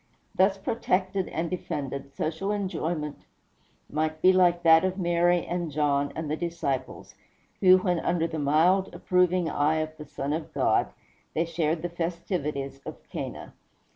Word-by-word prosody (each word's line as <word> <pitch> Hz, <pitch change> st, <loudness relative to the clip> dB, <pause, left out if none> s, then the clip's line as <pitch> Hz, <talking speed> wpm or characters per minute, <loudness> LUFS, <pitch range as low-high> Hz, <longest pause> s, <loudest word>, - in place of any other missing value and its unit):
Thus 195 Hz, +1 st, +3 dB
protected 190 Hz, -2 st, -1 dB
and 165 Hz, +2 st, -2 dB
defended, 140 Hz, -6 st, -5 dB
social 165 Hz, +6 st, -2 dB
enjoyment 170 Hz, -7 st, -3 dB, 0.7 s
might 155 Hz, +1 st, -2 dB
be 185 Hz, +3 st, +6 dB
like 175 Hz, -2 st, +3 dB
that 165 Hz, 0 st, +7 dB
of 185 Hz, 0 st, -1 dB
Mary 175 Hz, -1 st, +2 dB
and 175 Hz, -1 st, -2 dB
John, 145 Hz, -1 st, +1 dB
and 160 Hz, -1 st, -4 dB
the 150 Hz, -, -1 dB
disciples, 165 Hz, -6 st, -3 dB, 0.5 s
when, 185 Hz, -2 st, +5 dB
under 170 Hz, 0 st, 0 dB
the 160 Hz, -1 st, -3 dB
mild, 165 Hz, +7 st, +3 dB
approving 180 Hz, -1 st, +2 dB
eye 150 Hz, 0 st, +1 dB
of 155 Hz, 0 st, -2 dB
the 150 Hz, -, -8 dB
Son 140 Hz, +2 st, -3 dB
of 160 Hz, +1 st, -4 dB
God, -, -, +2 dB, 0.5 s
they 165 Hz, -, +1 dB
shared 165 Hz, -1 st, -1 dB
the -, -, 0 dB
festivities 165 Hz, -5 st, -3 dB
of -, -, -7 dB
Cana. -, -, -6 dB
170 Hz, 145 wpm, -27 LUFS, 155-180 Hz, 0.7 s, that